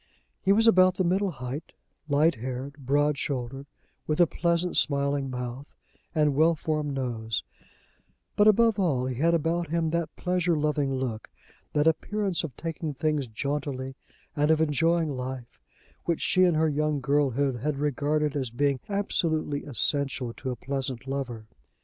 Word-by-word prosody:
He 190 - +2
was 220 +3 +4
about 185 -4 +6
the 185 - +1
middle 190 +3 +1
height, 130 -1 -6 0.4
light 150 +4 +4
haired, 130 +3 -5
broad 145 +2 +1
shouldered, 135 0 -3 0.4
with 155 +1 0
a 175 - +8
pleasant 170 +2 0
smiling 140 -1 +1
mouth 125 +2 -6 0.4
and 150 -2 +3
well 160 +4 +4
formed 150 -2 -2
nose; 115 -4 -2 0.9
but 205 - +5
above 225 0 +5
all, 140 -10 +1
he 130 - -2
had 170 +1 +4
about 165 +1 0
him 165 -1 0
that 170 -1 -2
pleasure 180 -2 0
loving 150 -2 0
look, 120 -5 -4 0.4
that 150 0 +2
appearance 185 +3 0
of 145 -7 -6
taking 160 -2 -4
things 150 -1 0
jauntily 135 +2 -3 0.4
and 150 0 +2
of 160 -1 +4
enjoying 160 0 +2
life, 125 -1 -6 0.4
which 170 -2 0
she 185 0 +4
in 175 -3 +3
her 160 +1 +3
young 150 0 0
girlhood 140 -1 +1
had 140 +4 -2
regarded 150 +1 0
as 130 -4 -1
being 140 +3 0
absolutely 160 -7 -1
essential 135 -2 0
to 130 - -6
a 125 - -2
pleasant 130 -1 -4
lover. 130 -5 -4
145 Hz, 155 wpm, -27 LUFS, 135-165 Hz, 0.9 s, a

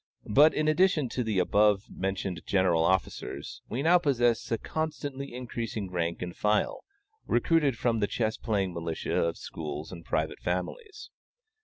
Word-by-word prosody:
But, 150 +5 +7
in 155 0 +1
addition 155 -4 +3
to 125 - -2
the 110 -3 -1
above 100 +2 +3
mentioned 95 -2 -3
general 90 -4 +3
officers, 95 +1 -1
we 130 +4 -2
now 175 +2 +6
possess 120 -8 +1
a 115 - +2
constantly 145 -3 -4
increasing 115 -5 -4
rank 85 -1 -2
and 90 0 -6
file, 105 0 0 0.4
recruited 150 -7 +2
from 115 -1 +1
the 100 - +1
chess 110 0 -1
playing 100 -5 -1
militia 85 -1 -3
of 85 0 +1
schools 75 -1 -6
and 85 -2 -9
private 80 -1 -1
families. 410 - -4
110 Hz, 150 wpm, -29 LUFS, 90-140 Hz, 0.4 s, But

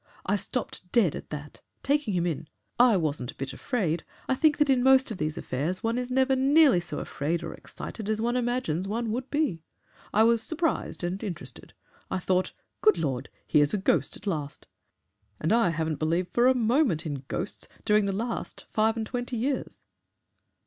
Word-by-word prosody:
I 200 - +2
stopped 200 -4 -4
dead 200 -11 +3
at - - -8
that 150 -1 -8 0.2
taking 280 -8 +1
him 175 -1 +1
in. 165 -2 -2 0.3
I 240 -4 +6
wasn't 145 -7 -2
a - - -7
bit 135 - -5
afraid. 175 - -1 0.2
I - - +2
think 295 +3 +3
that 295 - +3
in 265 -2 +3
most 265 -1 +5
of 210 - -5
these 155 0 -2
affairs 155 +9 -2
one 230 +2 +1
is 250 0 -4
never 265 +1 +3
nearly 275 - +5
so 170 -3 -5
afraid 160 +6 -2
or 165 - -5
excited 215 -2 -7
as 220 0 0
one 240 +2 0
imagines 240 -8 -1
one 225 +2 -2
would 255 +4 -3
be. 290 - 0 0.5
I 215 - +5
was 230 0 +4
surprised 320 - -1
and 185 +4 -2
interested. 155 - -7 0.4
I - - -1
thought, 185 0 0 0.3
'Good 215 -4 +5
Lord! 135 -5 -2 0.2
Here's 145 +4 +3
a - - +1
ghost 165 -7 +1
at - - -16
last! 150 -7 -3 0.7
And 160 +7 +1
I 230 -5 +4
haven't 160 -2 -2
believed 170 +3 0
for 240 +1 +4
a 260 - +5
moment 230 - +2
in 145 -4 -4
ghosts - - -4 0.2
during 210 -1 +4
the 200 - 0
last 230 +3 -4
five 220 +1 +2
and 220 - -1
twenty 245 +1 -3
years.'" 265 +4 -2
210 Hz, 190 wpm, -27 LUFS, 165-245 Hz, 0.7 s, I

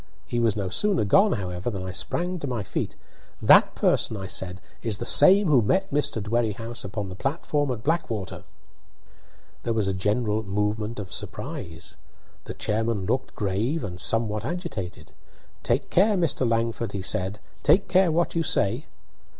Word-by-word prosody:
He 120 - -2
was 115 -3 +2
no 100 -3 -2
sooner 195 - +1
gone, 195 - +4
however, 90 0 -3
than 100 -5 -5
I 95 - -5
sprang 175 - -2
to 145 - -4
my 120 -5 -2
feet. - - -4 0.4
"That - - +6
person," 110 - +2
I 95 - -6
said, 95 0 -2 0.2
"is 110 -3 0
the 120 - -4
same 195 +9 +7
who 140 -6 +5
met 190 - +1
Mr. 145 -5 +1
Dwerrihouse 115 +1 -2
upon 100 +1 -4
the 90 - -7
platform 145 - -1
at 120 -4 -4
Blackwater!" 115 - -2 1.2
There 115 - -1
was 105 -3 +1
a 95 - 0
general 105 +3 0
movement 105 +2 -2
of 95 -4 -6
surprise. 80 -1 -5 0.5
The - - -7
chairman 110 -2 -1
looked 130 +6 -2
grave 110 +10 -1
and 90 -3 -4
somewhat 110 -1 +2
agitated. 110 - -5 0.5
"Take - - -1
care, 205 +3 +4
Mr. 140 -8 +1
Langford," 115 0 -1
he 100 -2 -4
said; 95 +2 -1 0.2
"take 195 - +4
care 185 -1 +4
what 170 +2 +1
you 165 - 0
say." 125 -2 0
115 Hz, 165 wpm, -25 LUFS, 100-145 Hz, 1.2 s, same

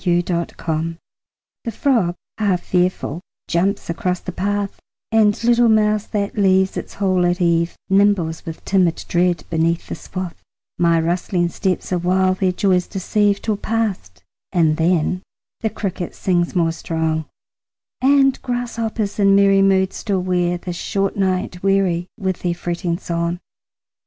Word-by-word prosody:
Summer 175 -2 +3
Evening 165 -2 -2 0.7
The 230 - -3
frog 220 -8 +1 0.2
half 195 -4 +1
fearful 180 -3 0 0.3
jumps 190 +4 0
across 180 +2 -1
the 185 - -6
path, 200 +2 -2 0.3
And 215 -1 +3
little 240 0 +4
mouse 215 -1 +2
that 205 -2 -2
leaves 190 -2 +3
its - - -6
hole 185 -3 +1
at 175 +1 +1
eve 170 -1 +1
Nimbles 195 -5 +2
with 165 -1 -8
timid 185 -4 +1
dread 175 0 +1
beneath 165 +1 +1
the - - -6
swath; 185 -2 -6 0.4
My 170 -1 +4
rustling 175 +1 0
steps 185 +1 -2
awhile 185 +1 +2
their 185 0 +1
joys 180 -1 +1
deceive, 205 +1 0
Till 215 -2 0
past, 200 - -3 0.3
and 160 -4 +2
then 170 +1 +1 0.4
the 220 - 0
cricket 190 -4 -4
sings 175 -2 0
more 165 -2 +2
strong, 160 -1 -2 0.8
And 270 0 +4
grasshoppers 230 -4 -3
in 195 -1 +5
merry 195 0 +5
moods 190 -1 +2
still 195 -3 -1
wear 175 -1 +1
The 175 0 -6
short 195 +3 -1
night 185 -2 -1
weary 190 -3 +1
with 190 -2 -2
their 175 -1 -1
fretting 170 0 -2
song. 170 -1 -2
185 Hz, 140 wpm, -20 LUFS, 170-200 Hz, 0.8 s, in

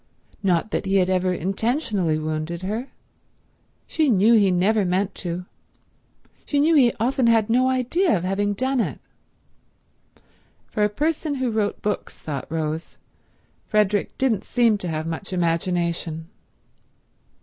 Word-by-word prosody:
Not 190 +1 +1
that 200 - -2
he 195 0 +3
ever 185 0 +1
intentionally 195 - 0
wounded 155 +3 -3
her; 220 +7 -3 1.0
she 310 -3 +1
knew 215 +1 +5
he 205 -4 +5
never 195 +4 +2
meant 190 +2 0
to, 180 0 -4 1.0
she 290 - 0
knew 315 +3 +4
he 260 -6 +5
often 250 +2 +1
had 225 -1 +3
no 255 +2 +3
idea 260 - +1
of 170 - -5
having 200 +2 0
done 260 +3 0
it. - - -2 1.7
For 210 - -2
a 210 - +3
person 300 +5 -1
who 260 -3 -1
wrote 215 -2 -1
books, 210 0 -3
thought 145 -1 -6
Rose, 160 0 -3 0.7
Frederick 210 -1 +1
didn't 230 -7 +1
seem 230 -4 +2
to 180 - -5
have 160 -1 -3
much 165 +4 -5
imagination. 170 -1 -1
200 Hz, 135 wpm, -23 LUFS, 175-235 Hz, 1.7 s, knew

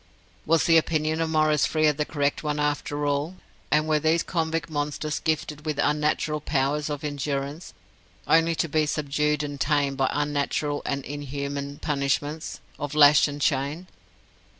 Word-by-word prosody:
Was 165 0 +4
the 165 -1 +5
opinion 155 0 -1
of 165 - 0
Maurice 155 -2 +3
Frere 155 -1 +2
the 150 +1 -2
correct 145 -2 -1
one 150 -1 -2
after 145 0 -1
all, 145 +5 -1 0.3
and 155 +1 +2
were 155 -1 +2
these 160 +2 +2
convict 165 -3 -1
monsters 150 0 -2
gifted 155 -1 -2
with 155 -2 -3
unnatural 150 +1 +1
powers 145 +1 0
of 145 0 -4
endurance, 145 - -4 0.5
only 165 0 +3
to 165 - 0
be 155 0 +1
subdued 150 0 0
and 145 -1 -5
tamed 140 -2 +1
by 135 -1 +2
unnatural 145 0 -1
and 140 -1 -2
inhuman 140 0 -5
punishments 145 +1 -2 0.2
of 145 0 -4
lash 150 0 +7
and 145 0 -6
chain? 140 +6 0
150 Hz, 150 wpm, -25 LUFS, 145-155 Hz, 0.5 s, lash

